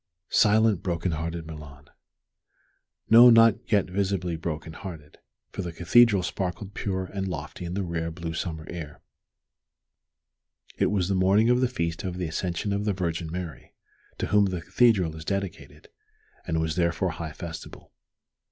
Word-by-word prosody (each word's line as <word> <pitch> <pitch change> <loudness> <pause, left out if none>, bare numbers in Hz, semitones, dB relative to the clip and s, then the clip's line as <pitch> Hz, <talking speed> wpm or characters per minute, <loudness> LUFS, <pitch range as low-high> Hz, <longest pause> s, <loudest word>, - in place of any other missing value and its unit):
Silent, 110 -2 +4
broken 85 0 -1
hearted 80 +1 -4
Milan! 75 -3 -11 1.2
No, 120 +2 +10
not 115 0 +5
yet 100 -3 +4
visibly 95 -2 -1
broken 80 0 -5
hearted, 80 -6 -10 0.3
for - - -4
the 90 -2 -4
Cathedral 100 +4 +4
sparkled 95 +2 -4
pure 95 -2 -2
and 95 +1 -4
lofty 80 0 -6
in 85 +1 -4
the 100 - -1
rare, 85 -2 -3
blue 80 0 -6
summer 80 -1 -4
air. 80 -4 -7 1.8
It - - +2
was 95 -4 0
the 100 - 0
morning 100 +5 +4
of 125 +1 +3
the 130 - +3
Feast 85 -7 -3
of 90 -2 -4
the 90 - -2
Ascension 85 +4 -2
of 100 +1 -1
the 105 - +1
Virgin 85 -3 -3
Mary, 85 -3 -7 0.4
to - - -2
whom 105 0 +4
the 90 -3 -2
Cathedral 100 -10 +3
is 80 - -8
dedicated, 100 +1 -5 0.6
and 80 -2 0
was 80 -1 -1
therefore 85 +1 +1
high 80 -2 -6
festival. 80 0 -9
90 Hz, 155 wpm, -26 LUFS, 80-100 Hz, 1.8 s, No